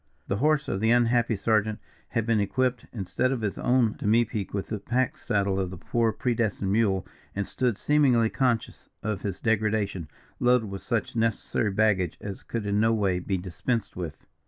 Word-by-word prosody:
The 100 - 0
horse 150 +4 +2
of 95 - -1
the 110 +2 +2
unhappy 120 -1 +3
sergeant 110 +1 +1 0.3
had 115 -3 -1
been 115 -2 +2
equipped, 125 +5 0
instead 120 +4 -1
of 130 -4 -2
his 105 -3 -2
own 125 -3 +3
demipique, 110 -1 +1
with 100 -1 -3
the 110 - -3
pack 125 +4 -1
saddle 100 -2 0
of 95 -2 -1
the 90 - -8
poor 115 +6 +1
predestined 110 -5 -1
mule, 100 -4 +2 0.3
and 100 -1 -2
stood, 125 -5 0
seemingly 130 -7 +3
conscious 125 -4 -1
of 105 -3 -2
his 100 -3 -3
degradation, 105 -5 0 0.3
loaded 125 -4 +3
with 95 - -5
such 115 -1 -2
necessary 115 -1 0
baggage 95 -4 +1
as 100 -2 -6
could 115 -3 -4
in 100 0 +1
no 110 +1 +4
way 100 -5 +1
be 95 +1 -1
dispensed 100 +5 -3
with. 85 -4 -6
110 Hz, 180 wpm, -27 LUFS, 100-120 Hz, 0.3 s, no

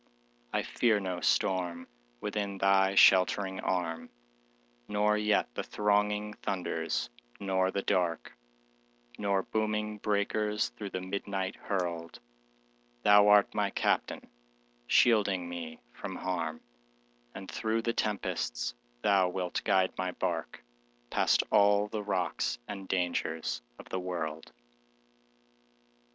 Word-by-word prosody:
I - - 0
fear 110 -3 +2
no 90 -2 -4
storm, 90 -2 0 0.3
within 100 -2 -3
thy 95 0 +3
sheltering 95 0 +5
arm, 80 -3 -2 0.8
Nor 105 +1 +2
yet 105 - +1
the - - -2
thronging 105 0 0
thunders, 85 -9 -2 0.3
nor 95 -1 +1
the 100 +1 -2
dark, 85 -11 0 0.8
Nor 100 -1 +1
booming 105 0 -2
breakers 105 - 0
through 80 +12 -7
the 90 - -4
midnight 95 0 -3
hurled; 85 -4 -3 0.8
Thou 105 0 +7
art 105 -1 +5
my - - +1
Captain, - - -1 0.6
shielding 100 - +3
me 85 -2 -6
from - - -6
harm, 80 -4 -3 0.7
And 95 - -8
through 110 +1 -1
the 115 - 0
tempests - - -2 0.3
thou 95 -2 +4
wilt 90 -1 -2
guide 95 -1 +2
my 90 -1 -1
bark - - -3 0.5
Past - - +3
all 100 0 +5
the 105 0 -4
rocks 90 -11 -1
and 95 -1 -7
dangers 80 -9 -1 0.2
of - - -13
the 95 - -2
world. 85 -4 -4
95 Hz, 110 wpm, -30 LUFS, 90-105 Hz, 0.8 s, Thou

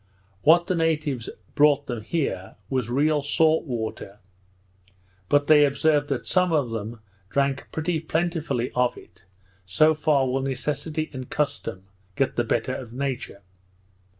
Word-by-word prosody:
What 170 +6 +5
the 185 - 0
natives 155 -7 -1 0.2
brought 145 -1 +4
them 120 -3 -4
here 105 - -3 0.2
was 130 -4 -1
real 145 +4 +2
salt 155 +3 +2
water; 110 -5 -5 1.1
but 145 0 +3
they 150 0 +6
observed 145 +1 +2
that 135 -3 -2
some 180 -1 +2
of 145 -7 +1
them 115 +1 -5 0.3
drank 140 +2 0
pretty 160 +1 -1
plentifully 160 -6 -1
of 125 -1 +1
it, - - -16 0.4
so 155 +12 +3
far 150 -3 +2
will 130 +1 0
necessity 145 +4 -3
and 130 -1 -7
custom 140 -10 -2 0.3
get 135 - 0
the 120 - +1
better 120 +2 -1
of 125 -3 -7
nature! 130 -6 -4
140 Hz, 140 wpm, -25 LUFS, 125-155 Hz, 1.1 s, they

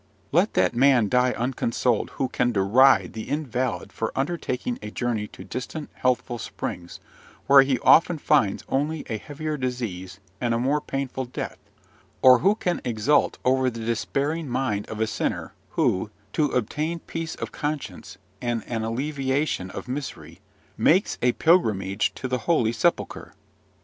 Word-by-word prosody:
Let 175 +8 +2
that - - +3
man 125 -4 +4
die 125 +1 +3
unconsoled 120 -1 0
who 135 - 0
can 125 -1 0
deride 105 -1 +4
the 110 - -6
invalid 130 -4 -2
for 115 - -2
undertaking 135 -4 -2
a 105 - -6
journey 110 -2 -2
to - - -12
distant, 145 +4 -6
healthful 125 -1 -1
springs, 85 -4 -6 0.5
where 140 0 +8
he 135 -1 +1
often 165 +1 +5
finds 140 -9 +2
only 150 +3 -1
a 110 - -1
heavier 150 +3 -4
disease 115 -8 -4 0.2
and 120 -2 +1
a - - 0
more 140 +4 +1
painful 135 -2 -3
death, 120 - -6 0.6
or 130 -1 +8
who 200 +3 +3
can 180 -5 -2
exult 120 +5 +2
over 130 0 +3
the 115 -2 -6
despairing 140 +7 -1
mind 120 -5 -1
of 110 - -6
a 110 - +2
sinner, 110 - -3 0.2
who, 95 +3 +1 0.2
to 155 - +2
obtain 150 +7 -1
peace 165 -1 -5
of - - -6
conscience 145 -12 -5 0.2
and 120 -2 -1
an 115 -2 -3
alleviation 135 -2 -1
of - - -7
misery, 95 - -6 0.4
makes 170 - +3
a 125 0 +3
pilgrimage 110 - +2
to 130 - -4
the 125 0 -1
Holy 120 -10 +3
Sepulchre. 120 +9 -1
125 Hz, 150 wpm, -25 LUFS, 115-145 Hz, 0.6 s, where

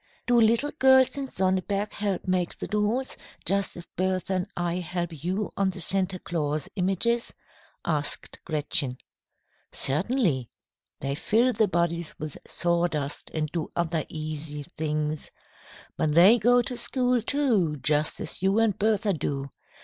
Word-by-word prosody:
"Do 240 -1 +4
little 230 +6 +3
girls 265 0 +6
in 275 -1 -3
Sonneberg 190 0 -1
help 200 -3 -2
make 185 -2 0
the - - -5
dolls, 210 +5 0 0.3
just 200 -1 0
as 170 - -8
Bertha 185 0 -1
and 185 +1 -1
I 175 0 0
help 175 -3 -4
you 190 +4 -1
on 195 -1 +2
the 190 0 -6
Santa 185 +1 +1
Claus 155 -4 -2
images?" 200 +5 0 0.5
asked 145 -3 -2
Gretchen. 145 -4 +1 0.7
"Certainly. 155 - +1 0.5
They 140 +1 -1
fill 230 - +2
the 220 -1 +3
bodies 170 -2 -1
with 155 -2 -6
sawdust, 170 -4 -1
and 155 -1 -1
do 165 -3 -3
other 165 -2 0
easy 155 -1 -5
things. 155 0 -2 0.7
But 150 -1 +1
they 195 +8 +8
go 245 +2 +4
to 250 - -4
school, 250 0 +1
too, 225 - +1
just 150 +1 0
as - - -4
you 195 +2 +2
and 225 -3 +3
Bertha 215 -1 +2
do. 140 -4 -3
180 Hz, 140 wpm, -27 LUFS, 155-215 Hz, 0.7 s, they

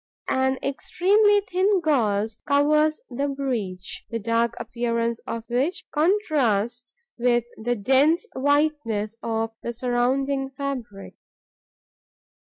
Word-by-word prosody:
An 265 0 +1
extremely 410 +9 +3
thin 390 +1 +1
gauze 220 - +1
covers 300 +2 +3
the 275 +4 -1
breach, 235 -10 -4
the 230 - -2
dark 230 +1 0
appearance 235 -1 -1
of 230 -1 -4
which 265 +9 -1
contrasts 275 - +1 0.2
with 240 -1 +3
the 245 +2 -1
dense 270 - +3
whiteness 275 -7 0
of 225 0 -2
the 235 - -4
surrounding 260 +3 0
fabric. 260 -7 -6
260 Hz, 100 wpm, -24 LUFS, 230-295 Hz, 0.2 s, extremely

